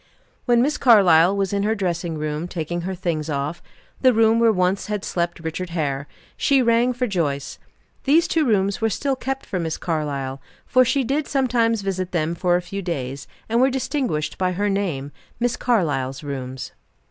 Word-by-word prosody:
When 240 -1 +4
Miss 295 +3 0
Carlyle 195 -6 +6
was 195 -1 -1
in 200 - +1
her 215 +2 +1
dressing 175 -4 -2
room 155 +2 -3
taking 175 0 -3
her 190 +2 -4
things 165 -4 -2
off 145 +3 -3 0.4
the 255 -2 +5
room 225 0 +4
where 230 -1 +5
once 185 0 0
had 210 -2 -3
slept 170 -1 -2
Richard 165 +3 -4
Hare 140 -2 -1 0.3
she 275 -1 +3
rang 235 +1 +3
for 250 0 -1
Joyce. 150 - -2 0.5
These 315 +5 +4
two 325 - +2
rooms 200 -6 +1
were 225 - +2
still 270 +6 -1
kept 270 +1 -4
for 185 - -3
Miss 160 -2 -2
Carlyle 140 -5 -3 0.2
for 255 0 +4
she 260 +2 +1
did 285 +4 -1
sometimes 235 -5 +1
visit 185 -2 -3
them 165 -1 0
for 175 +1 +1
a 180 - 0
few 195 +3 -5
days 140 -6 -4 0.2
and 230 +2 +2
were 265 - +5
distinguished 255 - -2
by 185 -1 +1
her 205 +3 0
name 165 -9 -2 0.3
"Miss 245 0 +1
Carlyle's 145 - 0
rooms." 130 -2 -5
185 Hz, 180 wpm, -22 LUFS, 160-230 Hz, 0.5 s, Carlyle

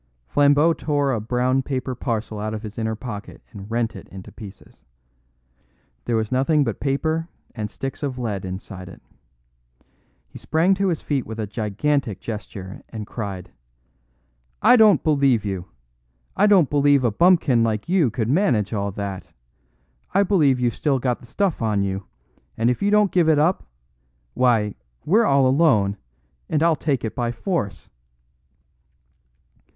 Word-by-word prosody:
Flambeau 145 - +4
tore 145 -3 0
a 110 - -2
brown 125 +4 +1
paper 130 -1 -3
parcel 115 -3 -3
out 110 +1 -3
of 110 - -7
his 110 +1 -7
inner 110 0 -1
pocket 105 -3 -8
and 100 -1 -10
rent 115 0 -1
it - - -10
in 95 -1 -10
pieces. 100 -2 -13 1.2
There 120 - 0
was 110 -1 -1
nothing 140 +4 +2
but 115 -5 -3
paper 160 +4 -1 0.2
and 105 -3 -4
sticks 135 +4 -6
of 135 -3 -3
lead 110 -6 -3
inside 95 0 -7
it. - - -13 1.3
He - - -12
sprang 165 +5 +2
to 195 +1 0
his 170 -4 -1
feet 140 -4 -2
with 110 0 -7
a 110 - -1
gigantic 110 +3 -1
gesture, 100 -4 -7
and 110 -2 -6
cried: 100 -5 -6 1.1
"I - - +6
don't 215 -8 +5
believe 140 -8 +2
you. 95 -3 -3 0.7
I 205 - +4
don't 190 -8 +4
believe 145 -2 +3
a 120 - +2
bumpkin 150 - +4
like 110 +1 -1
you 175 -7 +3
could 115 -1 -2
manage 125 - +1
all 100 -1 -1
that. 100 -2 -5 0.9
I 200 - +5
believe 155 -10 +3
you've 120 -2 +1
still 145 -3 +1
got 125 -1 -1
the 120 - -16
stuff 190 - -1
on 105 -3 +1
you, 95 0 -4 0.5
and 115 +2 +2
if 125 - -3
you 200 - +2
don't 210 -1 +3
give 170 -3 +3
it 155 - +4
up 165 +5 +1 0.7
why, 115 - +2 0.3
we're 220 +8 +4
all 135 -5 +4
alone, 130 -8 +3 0.5
and 155 0 +1
I'll 165 -1 +4
take 140 -5 -1
it 110 - -4
by 120 -1 -1
force!" 120 - -4
125 Hz, 160 wpm, -22 LUFS, 105-150 Hz, 1.3 s, I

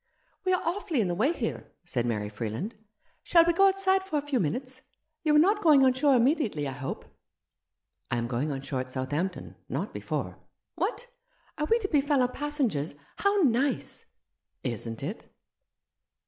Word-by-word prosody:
"We 370 - +3
are 365 - +1
awfully 340 -4 -1
in 200 -5 +1
the - - 0
way 225 - +2
here," 245 -9 -4
said 125 -9 -1
Mary 105 -3 -1
Freeland. 110 - -4 0.3
" - - -40
Shall 335 -2 +5
we 345 - +3
go 390 +3 +6
outside 385 0 +2
for 380 -5 -2
a - - +1
few 280 -4 0
minutes? 255 - -3 0.4
You 305 -2 +3
are - - +7
not 400 +7 +4
going 295 -6 +6
on 260 - +5
shore 275 +1 +3
immediately, 235 - +2
I - - -3
hope?" 135 0 -5 1.0
"I 120 - 0
am 120 - -1
going 130 +5 -1
on 135 -1 -4
shore 135 - -2
at 130 0 -5
Southampton 145 +8 -3
— - - -42
not - - -5
before! - - -4
" - - -56
" - - -59
What, 485 - -1 0.5
are 300 - 0
we 460 - +5
to 435 -4 -2
be 295 -6 +3
fellow 275 -3 +2
passengers? 250 - -2 0.2
How 400 -1 +2
nice! 265 +1 0 0.2
" - - -57
" - - -53
Isn't 115 -1 -4
it 190 +10 -6
255 Hz, 195 wpm, -28 LUFS, -, 1.0 s, are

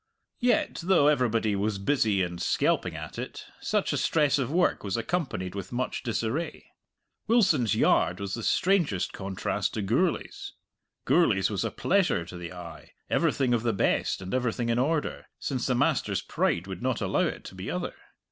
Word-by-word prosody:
Yet, 245 -3 +1
though 175 -5 +4
everybody 115 -7 +2
was 100 +1 0
busy 105 -3 +2
and 85 -1 -4
skelping - - +1
at - - -7
it, - - -6
such - - 0
a - - 0
stress 150 -3 +2
of 135 0 -1
work 180 +2 +2
was 100 0 -2
accompanied 115 - -2
with 100 -2 -6
much 125 +1 -2
disarray. 120 +6 -2 0.6
Wilson's 180 - +3
yard 90 - +3
was 100 -1 -4
the 115 - -3
strangest 170 - +1
contrast 95 -1 -2
to 105 - -1
Gourlay's. 150 - -1 0.5
Gourlay's - - +3
was - - -1
a - - 0
pleasure 180 - +1
to 90 - -10
the 85 -1 -7
eye, 90 -2 -10 0.2
everything 130 -3 +2
of 120 - +2
the 115 -1 0
best 95 - 0
and 95 - -6
everything 120 -1 0
in 115 +1 +2
order, 150 +4 -1
since 130 -4 -2
the 130 - +1
master's 120 - +1
pride 85 - 0
would 95 -2 -7
not 130 -2 0
allow - - +1
it - - -6
to - - -10
be - - -6
other. - - -3
120 Hz, 175 wpm, -27 LUFS, 100-150 Hz, 0.6 s, though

